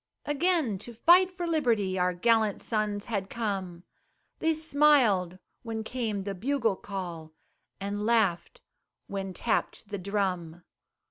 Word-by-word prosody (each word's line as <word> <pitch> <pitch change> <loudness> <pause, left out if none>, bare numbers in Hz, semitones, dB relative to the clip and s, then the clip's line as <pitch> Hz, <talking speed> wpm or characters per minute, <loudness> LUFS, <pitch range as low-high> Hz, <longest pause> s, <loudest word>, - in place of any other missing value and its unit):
Again 295 - +1
to 235 +3 -9
fight 355 +9 +6
for 360 -1 -5
liberty, 230 - +1
Our 180 0 +2
gallant 220 +1 +2
sons 210 -2 -1
had 200 -4 -3
come, 190 -6 -3 0.6
They 325 - +2
smiled 280 - +3 0.2
when 225 -2 -4
came 220 -5 -3
the 200 0 -3
bugle 230 +1 0
call, 175 -6 -7 0.5
And 200 +1 -3
laughed 220 - +1 0.4
when 195 -1 -4
tapped 215 +1 -2
the 205 -2 -4
drum. 180 -4 -2
210 Hz, 125 wpm, -28 LUFS, 190-245 Hz, 0.6 s, fight